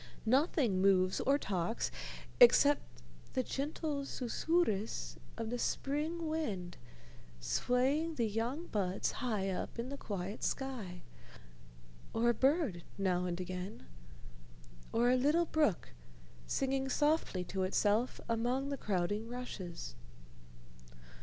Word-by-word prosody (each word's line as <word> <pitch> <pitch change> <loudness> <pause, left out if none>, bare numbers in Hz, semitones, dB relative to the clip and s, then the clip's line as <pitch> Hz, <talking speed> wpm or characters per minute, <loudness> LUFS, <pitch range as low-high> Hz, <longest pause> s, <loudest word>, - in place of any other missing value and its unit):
Nothing 255 - +3
moves 190 -1 +4
or 275 +2 +3
talks, 190 -3 -1 0.5
except 290 - +7 0.5
the 255 - +1
gentle 290 +2 -2
susurrus 250 - 0 0.2
of 225 -1 -3
the 245 - -2
spring 310 +7 -1
wind 205 - -2 0.6
swaying 260 - +1
the 235 - +1
young 235 +10 -2
buds 195 - -1
high 210 -7 -1
up 185 - -4
in 235 +2 -3
the 280 - -5
quiet 200 -3 -4
sky, 225 -10 -3 1.1
or 235 +1 +3
a - - 0
bird 265 - +2
now 180 -2 +1
and 175 0 -2
again, 185 - -5 1.1
or 240 +2 +3
a - - +5
little 295 +7 +3
brook 300 - +1 0.6
singing 270 0 0
softly 295 - +1
to 190 +1 -3
itself 205 +5 +2
among 245 +4 0
the 280 - -2
crowding 205 +1 -1
rushes. 190 - -6
235 Hz, 115 wpm, -34 LUFS, 190-280 Hz, 1.1 s, except